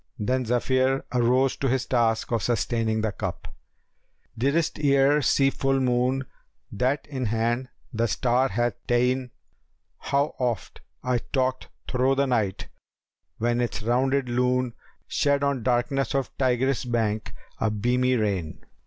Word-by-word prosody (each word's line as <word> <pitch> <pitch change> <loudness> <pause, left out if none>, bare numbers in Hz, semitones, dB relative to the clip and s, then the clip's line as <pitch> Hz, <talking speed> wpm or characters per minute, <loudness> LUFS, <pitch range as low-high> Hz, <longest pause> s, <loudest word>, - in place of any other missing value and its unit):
Then 125 +4 0
Zephyr 130 +3 +1
arose 125 +2 +3
to 135 - -1
his 130 0 0
task 115 -3 +1
of 115 -2 +1
sustaining 115 -1 0
the 110 -1 0
cup: 95 -4 -6 0.4
* - - -44
Didst 155 +3 +1
e'er 140 0 +4
see 135 0 +3
full 135 0 0
Moon 130 +1 +1 0.5
that 130 +7 0
in 135 -3 -4
hand 115 +4 0 0.2
the 115 +1 +1
star 125 +4 +2
hath 120 +2 0
ta'en?[FN#283] 125 +1 +1 0.7
How 140 +2 0
oft 120 -5 -2 0.2
I 125 -1 +1
talked 130 +1 -2 0.2
thro' 130 +1 +2
the 140 +1 +2
night, 110 -7 -1 0.7
when 120 +1 0
its 120 -1 -2
rounded 130 +3 +1
Lune 125 0 +1 0.2
* - - -42
Shed 140 -1 +1
on 140 -3 0
darkness 130 +2 0
of 135 -3 -2
Tigris' 130 -1 +1
bank 110 -3 -1 0.2
a 110 - +1
beamy 125 +4 +1
rain! 100 -8 -2
125 Hz, 140 wpm, -25 LUFS, 115-135 Hz, 0.7 s, e'er